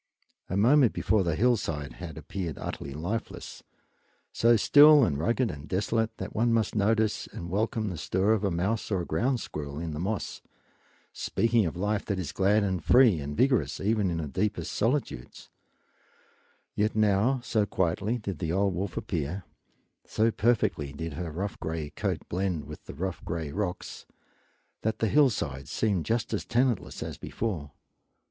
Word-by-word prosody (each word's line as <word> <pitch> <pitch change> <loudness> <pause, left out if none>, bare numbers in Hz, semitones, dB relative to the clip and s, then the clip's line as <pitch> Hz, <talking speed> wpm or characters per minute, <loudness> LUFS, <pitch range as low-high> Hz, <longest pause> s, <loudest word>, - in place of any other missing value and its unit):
A 95 - -1
moment 125 +4 +5
before 110 -3 +2
the 85 -3 0
hillside 80 - 0
had 80 -2 -8
appeared 85 0 -5
utterly 70 0 -6
lifeless, 100 +9 -5 0.7
so 115 +1 +4
still 145 +6 +7
and 70 -11 +1
rugged 115 +7 +1
and 75 +1 -9
desolate 110 +5 0
that 95 - -6
one 115 +2 +2
must 115 -1 +1
notice 110 +1 +1
and 85 0 -7
welcome 110 +1 0
the 85 -5 -5
stir 95 +7 +2
of 110 -2 0
a 100 - +2
mouse 95 +6 -1
or 95 -5 -1
ground 120 +11 0
squirrel 70 -1 -6
in 80 0 -4
the 75 - -5
moss, 100 +4 -3 0.7
speaking 115 -4 +1
of 80 - -5
life 105 +2 0
that 100 - -1
is 85 -6 -3
glad 100 +5 +3
and 95 -4 -1
free 120 -9 +5
and 75 +1 -5
vigorous 130 - +2
even 105 -1 +1
in 85 - -2
the 80 -2 -3
deepest 100 +9 -2
solitudes; 115 - -2 1.2
yet 105 +1 0
now, 110 +5 +3
so 110 -4 +1
quietly 95 +6 0
did 100 -8 -5
the 80 0 -2
old 95 +2 +1
wolf 90 +1 -4
appear, 85 +4 -3 0.6
so 115 +1 +2
perfectly 105 - +1
did 80 +1 -5
her 85 +2 -4
rough 95 +6 -4
gray 80 -2 -4
coat - - -3
blend 90 -3 -2
with 75 +1 -10
the - - -9
rough 95 +3 -4
gray 80 -3 -4
rocks, 95 0 -4 0.7
that 110 0 -1
the 110 - +1
hillside 90 - +2
seemed 100 -7 0
just 115 0 0
as - - -1
tenantless 120 0 0
as - - -7
before. 90 -11 -3
100 Hz, 165 wpm, -28 LUFS, 80-110 Hz, 1.2 s, still